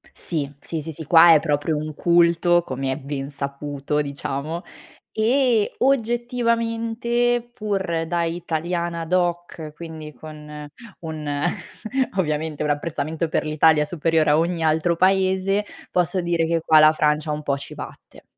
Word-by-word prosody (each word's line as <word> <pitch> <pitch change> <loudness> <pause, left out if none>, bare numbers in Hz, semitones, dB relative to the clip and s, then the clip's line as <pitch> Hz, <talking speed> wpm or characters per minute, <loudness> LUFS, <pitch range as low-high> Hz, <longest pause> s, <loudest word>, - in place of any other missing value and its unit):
Sì, 145 -5 -3
sì, 160 +1 -5
sì, 160 0 -7
qua 165 +2 +8
è 155 - +6
proprio 150 0 0
un 155 +1 -4
culto, 170 +1 +3
come 135 -1 -3
è 130 - -2
ben 140 -1 -5
saputo, 140 +1 -3
diciamo, 140 +3 -4 0.5
e 235 -1 +2
oggettivamente, 240 -1 0
pur 190 -7 -2
da 170 0 0
italiana 170 0 -2
doc, 175 -3 -1
quindi 160 -2 -8
con 150 -1 -10 0.3
un 150 -3 -4 0.8
ovviamente 155 -3 -1
un 150 - 0
apprezzamento 155 +1 -2
per - - -1
l'Italia 155 0 +4
superiore 160 -1 +1
a 150 - +4
ogni 170 0 0
altro 160 +2 +2
paese, 190 +2 +2 0.3
posso 180 +1 +1
dire 170 -1 0
che 165 0 +1
qua 155 -1 +5
la 155 0 +7
Francia 150 0 +1
un 150 0 -4
po' 140 -2 0
ci 140 - -8
batte. - - -11
165 Hz, 135 wpm, -22 LUFS, 150-180 Hz, 0.8 s, qua